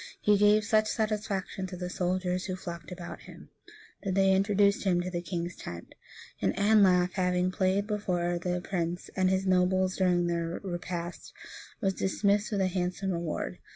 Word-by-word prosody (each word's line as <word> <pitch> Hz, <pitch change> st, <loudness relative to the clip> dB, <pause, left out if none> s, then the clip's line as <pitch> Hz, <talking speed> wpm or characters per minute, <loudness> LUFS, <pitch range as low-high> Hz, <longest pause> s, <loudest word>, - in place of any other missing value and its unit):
He 210 Hz, -, +4 dB
gave 210 Hz, +1 st, +5 dB
such 215 Hz, 0 st, +3 dB
satisfaction 210 Hz, -4 st, -2 dB
to 180 Hz, 0 st, -7 dB
the 180 Hz, 0 st, -4 dB
soldiers, 180 Hz, 0 st, -1 dB
who 185 Hz, -, -3 dB
flocked 170 Hz, -3 st, -8 dB
about 175 Hz, -1 st, -7 dB
him, -, -, -14 dB, 0.5 s
that 190 Hz, -2 st, -2 dB
they 195 Hz, -1 st, +4 dB
introduced 200 Hz, +1 st, +3 dB
him 185 Hz, -3 st, +2 dB
to 185 Hz, +1 st, -4 dB
the 175 Hz, -1 st, -2 dB
king's 175 Hz, 0 st, -4 dB
tent; 85 Hz, -1 st, -8 dB, 0.5 s
and -, -, +1 dB
Anlaf, 195 Hz, -4 st, +4 dB
having 180 Hz, -1 st, +1 dB
played 190 Hz, +1 st, +1 dB
before 180 Hz, -5 st, -1 dB
that 180 Hz, 0 st, -2 dB
prince 175 Hz, -2 st, -3 dB
and 185 Hz, -1 st, +2 dB
his 190 Hz, 0 st, +1 dB
nobles 185 Hz, 0 st, +2 dB
during 180 Hz, -2 st, +2 dB
their 170 Hz, 0 st, -2 dB
repast, 175 Hz, -1 st, -5 dB, 0.5 s
was 195 Hz, -3 st, +1 dB
dismissed 200 Hz, +3 st, +1 dB
with 200 Hz, -2 st, 0 dB
a 190 Hz, -, +3 dB
handsome 185 Hz, +1 st, -2 dB
reward. 170 Hz, -3 st, -3 dB
185 Hz, 165 wpm, -29 LUFS, 175-200 Hz, 0.5 s, gave